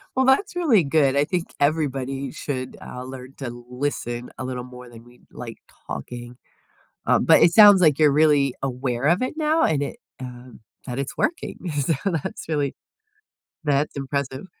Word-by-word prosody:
Well, 260 - +3
that's 275 +10 +3
really 285 - +4
good, 140 -2 +2
I 140 - +4
think 175 +2 -3
everybody 135 -3 0
should, 130 -3 -5
uh, 125 - -7
learn 130 +1 -9
to 130 -4 -5 0.2
listen 125 -2 -3
a - - -5
little 125 -1 -4
more 125 -1 -12
than 115 -1 -14
we 120 0 -20
like - - -8 0.3
talking, 120 0 -7 0.7
um, - - +3
but - - +6
it 170 - +5
sounds 205 -2 +9
like 155 -4 +4
you're 150 -2 +6
really 145 -3 +4
aware 125 -1 -2
of 170 +7 +3
it 255 - -1
now 315 +1 +2
and 145 -3 +2
it, - - -5 0.3
uh 125 0 -9 0.4
that 125 +2 -4
it's 140 - -4
working, 335 - -2
so, 145 +2 0
that's 165 -6 -3
really 145 -4 -1 0.9
that's 145 0 +1
impressive. 135 +1 -3
140 Hz, 170 wpm, -23 LUFS, 125-160 Hz, 0.9 s, sounds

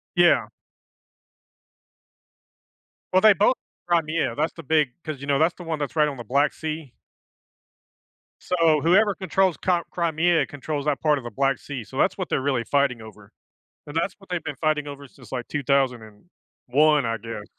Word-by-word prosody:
Yeah. - - +5 2.7
Well, 185 - +5
they 215 -1 +8
both 205 +7 +3 0.3
Crimea. 160 -6 +1
That's 160 - -1
the 165 - -10
big 150 -1 +2
'cause, 155 -4 -6
you 140 - -7
know, 140 -1 +2
that's 160 +3 +3
the 175 - -11
one 165 -2 -3
that's 145 +1 -4
right 150 -1 +4
on 140 -3 -5
the 120 - -7
Black 140 +6 +2
Sea. 155 -5 -6 1.5
So 165 -4 +2
whoever 195 +4 +4
controls 190 -2 +1
Cri 175 -2 +1
Crimea 170 0 +1
controls 145 +1 -5
that 150 -2 0
part 150 -2 +3
of 130 - -7
the 120 - -7
Black 135 +3 +1
Sea. 135 -5 -6
So 130 +5 -11
that's 190 - +2
what 185 - -4
they're - - 0
really 130 -3 0
fighting 140 -3 +1
over. 105 -1 -14 0.6
And 145 - -9
that's 175 +3 0
what 195 - -19
they've 175 -3 -2
been 145 -3 -5
fighting 155 -2 0
over 140 0 -8
since, 130 -1 -18
like, 125 -2 -4
2001, 140 - 0
I 115 - -1
guess. 115 -1 -7
150 Hz, 175 wpm, -24 LUFS, 135-165 Hz, 2.7 s, they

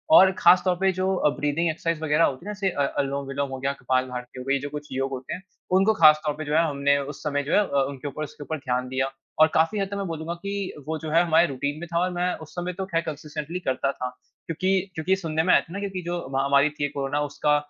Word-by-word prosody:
और 190 -7 +8
ख़ास 180 - +7
तौर 180 - +3
पे 190 0 +4
जो 190 0 +1
अ, 150 - +3
ब्रीदिंग 150 +3 +1
एक्सरसाइज़ 165 0 -2
वग़ैरह 155 +2 +3
होती 135 +7 0
है - - -5
ना - - -3
जैसे 195 -1 0
अ, 145 - -2 0.2
अनुलोम-विलोम 140 0 -2
हो 130 0 -5
गया, 135 +1 -1
कपालभाति 130 0 -2
हो - - -5
गयी 140 0 +2
ये 135 - -2
जो 145 - -4
कुछ 150 0 -7
योग 135 +1 -1
होते 130 -1 -5
हैं 180 - -6 0.4
उनको 205 +3 +4
खास 155 -4 +6
तौर 150 - +1
पे 155 - -5
जो 150 - -2
है 165 - +5
हमने 140 0 +2 0.2
उस - - -14
समय 145 -1 0
जो 150 - -2
है - - +6
अ, 140 -9 +1
उनके 140 +1 -6
ऊपर 150 +2 -4
उसके 145 0 -8
ऊपर 160 +2 -3
ध्यान 125 -2 -2
दिया। 130 +1 -1 0.3
और 155 - +9
काफ़ी 165 +6 +2
हद 195 - 0
तक - - -2
मैं 200 - -2
बोलूँगा 165 +1 -4
कि 200 0 -4 0.4
वो 160 0 -1
जो 155 - -5
है 165 +2 +5
हमारे 165 0 +4
रूटीन 140 +2 -3
में 175 - -6
था 170 - +3
और 180 +1 +1
मैं 175 +1 0 0.2
उस 155 - -13
समय 180 +1 -3
तो 190 +1 -4
ख़ैर 165 0 +2
कंसिस्टेंटली 155 +2 -5
करता 135 -3 0
था। 125 0 -4 0.4
क्योंकि 185 +4 -1 0.3
क्योंकि 160 +4 +1
सुनने 160 -4 -1
में 185 - +4
आया - - +6
था 170 - -13
ना 200 - -3
क्योंकि 195 -2 -4
जो 175 - -2 0.2
महामारी 140 +2 +3
थी 145 -1 -2
कोरोना 140 +1 -2
उसका 150 +1 +1
150 Hz, 270 wpm, -25 LUFS, 140-175 Hz, 0.4 s, और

